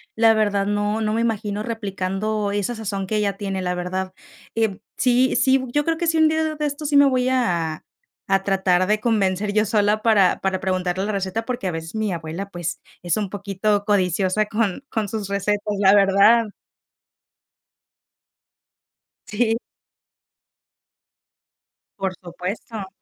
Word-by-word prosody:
la 225 Hz, 0 st, +5 dB
verdad, 205 Hz, -2 st, +1 dB
no 205 Hz, +1 st, 0 dB
no 215 Hz, -1 st, 0 dB
me 230 Hz, -, +1 dB
imagino 210 Hz, -2 st, -1 dB
replicando 205 Hz, -1 st, -2 dB
esa 205 Hz, +4 st, -1 dB
sazón 200 Hz, -3 st, -4 dB
que 215 Hz, -, -2 dB
ella 205 Hz, -2 st, 0 dB
tiene, 195 Hz, -2 st, -3 dB
la 180 Hz, 0 st, -1 dB
verdad, 185 Hz, +1 st, -3 dB, 0.4 s
eh, 220 Hz, -4 st, 0 dB, 0.2 s
sí 250 Hz, +1 st, +2 dB
sí, 265 Hz, 0 st, +4 dB
bu 260 Hz, -2 st, -5 dB
yo 295 Hz, 0 st, +2 dB
creo 330 Hz, -1 st, 0 dB
que 340 Hz, -, -1 dB
sí, 325 Hz, 0 st, +1 dB
un 315 Hz, -, +6 dB
día 315 Hz, +1 st, +1 dB
de 310 Hz, -1 st, -2 dB
de 300 Hz, -, -2 dB
estos 290 Hz, +1 st, -4 dB
sí 285 Hz, -, +4 dB
me 285 Hz, -, +7 dB
voy 255 Hz, -1 st, +2 dB
a 170 Hz, -11 st, 0 dB, 0.5 s
a 195 Hz, 0 st, +2 dB
tratar 190 Hz, -2 st, +2 dB
de 210 Hz, 0 st, +2 dB
convencer 205 Hz, -3 st, 0 dB
yo 215 Hz, +1 st, +3 dB
sola 210 Hz, 0 st, +2 dB
para 205 Hz, -5 st, +4 dB
para 190 Hz, -1 st, 0 dB
preguntarle 185 Hz, 0 st, -1 dB
la 215 Hz, -, -2 dB
receta, 195 Hz, +3 st, -2 dB
porque 250 Hz, -5 st, -4 dB
a 180 Hz, -, 0 dB
veces 165 Hz, +4 st, -6 dB
mi 215 Hz, -2 st, -1 dB
abuela, 170 Hz, +4 st, -5 dB
pues, 175 Hz, -2 st, -4 dB, 0.2 s
es 175 Hz, +3 st, 0 dB
un 205 Hz, -3 st, -2 dB
poquito 205 Hz, +1 st, -1 dB
codiciosa 195 Hz, 0 st, +1 dB
con 215 Hz, +2 st, -1 dB
con 215 Hz, -4 st, -2 dB
sus 210 Hz, -3 st, -4 dB
recetas, 200 Hz, +1 st, -1 dB, 0.2 s
la 195 Hz, 0 st, +6 dB
verdad. 200 Hz, +3 st, +5 dB, 2.8 s
Sí. 225 Hz, +1 st, +1 dB, 2.4 s
Por 190 Hz, -1 st, -2 dB
supuesto. 190 Hz, +4 st, -6 dB
205 Hz, 160 wpm, -22 LUFS, 190-225 Hz, 2.8 s, me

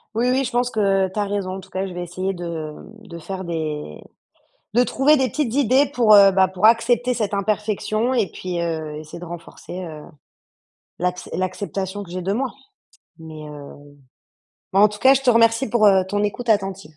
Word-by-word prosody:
Oui, 240 Hz, +3 st, +1 dB
oui, 265 Hz, +1 st, +2 dB
je 255 Hz, -, -4 dB
pense 245 Hz, 0 st, +1 dB
que 195 Hz, -4 st, +1 dB
tu 210 Hz, -, -3 dB
as 205 Hz, -, +1 dB
raison. 195 Hz, -2 st, -3 dB
En -, -, -6 dB
tout 190 Hz, -, -14 dB
cas, 190 Hz, +1 st, -3 dB
je 185 Hz, -, -8 dB
vais 175 Hz, 0 st, -4 dB
essayer 185 Hz, +3 st, -3 dB
de, 175 Hz, -1 st, -7 dB
hem, 160 Hz, +2 st, -7 dB
de 185 Hz, -6 st, -11 dB
faire 190 Hz, +3 st, -6 dB
des 155 Hz, -, -5 dB, 0.7 s
de 245 Hz, -, +5 dB
trouver 270 Hz, +4 st, +3 dB
des 265 Hz, -2 st, +1 dB
petites 270 Hz, -7 st, -2 dB
idées 270 Hz, +1 st, +3 dB
pour, 230 Hz, -4 st, +5 dB
heu, 200 Hz, -1 st, +8 dB
bah 190 Hz, 0 st, +4 dB
pour 190 Hz, +3 st, +2 dB
accepter 240 Hz, +2 st, +3 dB
cette 215 Hz, -4 st, -2 dB
imperfection 215 Hz, +3 st, -1 dB
et 230 Hz, -7 st, +1 dB
puis, 180 Hz, -2 st, -4 dB
heu, 160 Hz, -3 st, -3 dB
essayer 155 Hz, +2 st, -9 dB
de 175 Hz, -, -8 dB
renforcer, 175 Hz, +1 st, -9 dB
heu, 155 Hz, -3 st, -9 dB, 1.0 s
l'acce 180 Hz, +1 st, -2 dB
l'acceptation 190 Hz, +1 st, -3 dB
que 185 Hz, -, -12 dB
j'ai 180 Hz, +1 st, -4 dB
de 190 Hz, +3 st, -1 dB
moi 255 Hz, +2 st, -2 dB, 0.7 s
mais, 155 Hz, -1 st, -10 dB
heu 145 Hz, -1 st, -10 dB, 1.0 s
mais 195 Hz, -, +4 dB
en 210 Hz, -, +7 dB
tout 210 Hz, 0 st, -9 dB
cas, 265 Hz, +5 st, +6 dB
je 270 Hz, -, 0 dB
te 255 Hz, -, +4 dB
remercie 230 Hz, +2 st, +3 dB
pour, 215 Hz, -2 st, +4 dB
heu, 190 Hz, -2 st, +5 dB
ton 205 Hz, +1 st, 0 dB
écoute 235 Hz, +4 st, -4 dB
attentive. 195 Hz, -7 st, -1 dB
195 Hz, 205 wpm, -21 LUFS, 175-230 Hz, 1.0 s, heu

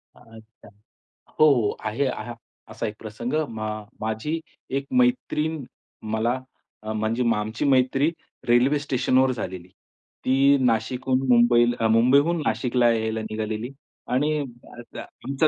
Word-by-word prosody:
अच्छा. 115 Hz, -2 st, -17 dB, 0.7 s
हो, 155 Hz, -, +7 dB
हो. 115 Hz, -5 st, 0 dB
आहे 110 Hz, +6 st, 0 dB, 0.6 s
असा 110 Hz, +1 st, -5 dB
एक 105 Hz, -, -6 dB
प्रसंग 110 Hz, +3 st, -6 dB, 0.2 s
म 110 Hz, -1 st, -7 dB, 0.4 s
माझी 110 Hz, +9 st, -2 dB, 0.4 s
एक 135 Hz, -, -11 dB
मैत्रीण 160 Hz, -, 0 dB, 0.5 s
मला 115 Hz, +3 st, 0 dB, 0.4 s
अ, 110 Hz, 0 st, -4 dB
म्हणजे 110 Hz, +3 st, -1 dB
आमची 110 Hz, +5 st, -3 dB
मैत्री 135 Hz, +2 st, +3 dB, 0.4 s
रेल्वे 125 Hz, +5 st, +4 dB
स्टेशनवर 130 Hz, -1 st, +2 dB
झालेली. 95 Hz, -6 st, -6 dB, 0.6 s
ती 135 Hz, +2 st, +4 dB
नाशिकहून 125 Hz, +3 st, +1 dB
मुंबई 120 Hz, 0 st, +5 dB, 0.3 s
मुंबईहून 140 Hz, +9 st, +4 dB
नाशिकला 120 Hz, +2 st, +2 dB
यायला 110 Hz, -1 st, -1 dB
निघालेली 110 Hz, +1 st, -4 dB, 0.4 s
आणि 150 Hz, +4 st, +1 dB, 0.6 s
आमच्या 140 Hz, +3 st, -1 dB
120 Hz, 110 wpm, -24 LUFS, 110-135 Hz, 0.7 s, हो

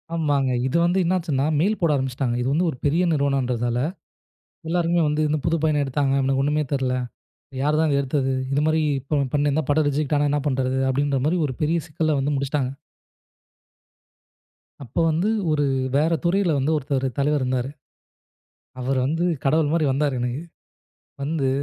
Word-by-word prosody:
ஆமாங்க. 145 Hz, -5 st, +1 dB, 0.2 s
இது 130 Hz, -, 0 dB
வந்து 175 Hz, +2 st, +1 dB
என்ன 175 Hz, +2 st, +1 dB
ஆச்சுன்னா, 145 Hz, -6 st, -1 dB
மெயில் 205 Hz, +7 st, +1 dB
போட 165 Hz, -, +3 dB
ஆரம்பிச்சுட்டாங்க. 130 Hz, -2 st, -1 dB
இது 120 Hz, -, -1 dB
வந்து 170 Hz, +5 st, +2 dB
ஒரு 130 Hz, -, -5 dB
பெரிய 160 Hz, +5 st, +2 dB
நிறுவனம்ன்றதால, 130 Hz, -5 st, 0 dB, 0.9 s
எல்லாருமே 170 Hz, 0 st, +1 dB
வந்து 150 Hz, +1 st, 0 dB
இந்தப் 150 Hz, -1 st, -1 dB
புது 165 Hz, 0 st, +2 dB
பையன 150 Hz, -2 st, +2 dB
எடுத்தாங்க. 135 Hz, 0 st, 0 dB
இவனுக்கு 135 Hz, 0 st, +1 dB
ஒண்ணுமே 150 Hz, +1 st, +1 dB
தெரில. 130 Hz, -2 st, 0 dB, 0.7 s
யாருதான் 150 Hz, +1 st, +2 dB
எடுத்தது? 135 Hz, -1 st, 0 dB, 0.2 s
இது 145 Hz, -, +2 dB
மாதிரி 155 Hz, 0 st, +2 dB, 0.2 s
இப்ப 145 Hz, +2 st, -1 dB, 0.2 s
பண்ணிருந்தா 145 Hz, +1 st, +1 dB
படம் 145 Hz, 0 st, +3 dB
ரிஜக்ட் 150 Hz, +1 st, 0 dB
ஆனா 145 Hz, -, +2 dB
என்ன 145 Hz, -, +1 dB
பண்றது 130 Hz, -1 st, 0 dB
அப்படிங்கிற 140 Hz, +1 st, +1 dB
மாதிரி 170 Hz, +4 st, +2 dB
ஒரு 130 Hz, -, -4 dB
பெரிய 155 Hz, +3 st, +2 dB
சிக்கலை 155 Hz, 0 st, 0 dB
வந்து 140 Hz, +2 st, 0 dB
முடிச்சிட்டாங்க. 140 Hz, -1 st, -1 dB, 2.1 s
அப்ப 120 Hz, -, -15 dB
வந்து 165 Hz, +6 st, +1 dB, 0.2 s
ஒரு 145 Hz, -1 st, +2 dB, 0.3 s
வேற 155 Hz, +4 st, +3 dB
துறையில் 175 Hz, -3 st, +2 dB
வந்து 140 Hz, +3 st, 0 dB
ஒருத்தர் 135 Hz, -2 st, -2 dB
தலைவர் 145 Hz, +1 st, +1 dB
இருந்தாரு. 125 Hz, 0 st, -1 dB, 1.1 s
அவர் 130 Hz, +1 st, 0 dB
வந்து 165 Hz, +4 st, 0 dB, 0.2 s
கடவுள் 150 Hz, +1 st, +2 dB
மாதிரி 165 Hz, -2 st, +2 dB
வந்தாரு 140 Hz, 0 st, 0 dB
எனக்கு. 125 Hz, +4 st, -2 dB, 0.8 s
வந்து 145 Hz, -1 st, -1 dB
145 Hz, 155 wpm, -23 LUFS, 135-155 Hz, 2.1 s, போட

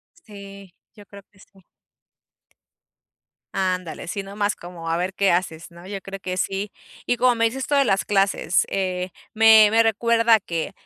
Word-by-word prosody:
Sí, 200 Hz, -, -13 dB, 0.2 s
yo 205 Hz, -, -15 dB
creo 200 Hz, 0 st, -13 dB
que 200 Hz, -, -26 dB
sí. 195 Hz, 0 st, -21 dB, 1.9 s
Ándale, 185 Hz, -4 st, -3 dB
si 200 Hz, +3 st, -4 dB
no 195 Hz, +1 st, -11 dB
más 205 Hz, 0 st, 0 dB
como 170 Hz, -2 st, -8 dB
a 165 Hz, -, +1 dB
ver 180 Hz, +2 st, -2 dB
qué 200 Hz, -1 st, +1 dB
haces, 170 Hz, -2 st, -2 dB
¿no? 170 Hz, +1 st, -14 dB
Yo 195 Hz, 0 st, -6 dB
creo 195 Hz, +1 st, -9 dB
que 185 Hz, 0 st, -5 dB
sí. 195 Hz, +2 st, -2 dB, 0.3 s
Y 245 Hz, -, 0 dB
como 250 Hz, 0 st, +3 dB
me 230 Hz, 0 st, +1 dB
dices 235 Hz, +4 st, -3 dB
esto 290 Hz, -, -2 dB
de 280 Hz, -, +4 dB
las 195 Hz, -5 st, +1 dB
clases, 195 Hz, -4 st, +1 dB
eh, 185 Hz, -1 st, -2 dB, 0.2 s
me 220 Hz, -1 st, +7 dB
me 225 Hz, +1 st, +5 dB
recuerda 230 Hz, +1 st, +3 dB
que 170 Hz, -5 st, -4 dB
195 Hz, 175 wpm, -22 LUFS, 185-220 Hz, 1.9 s, me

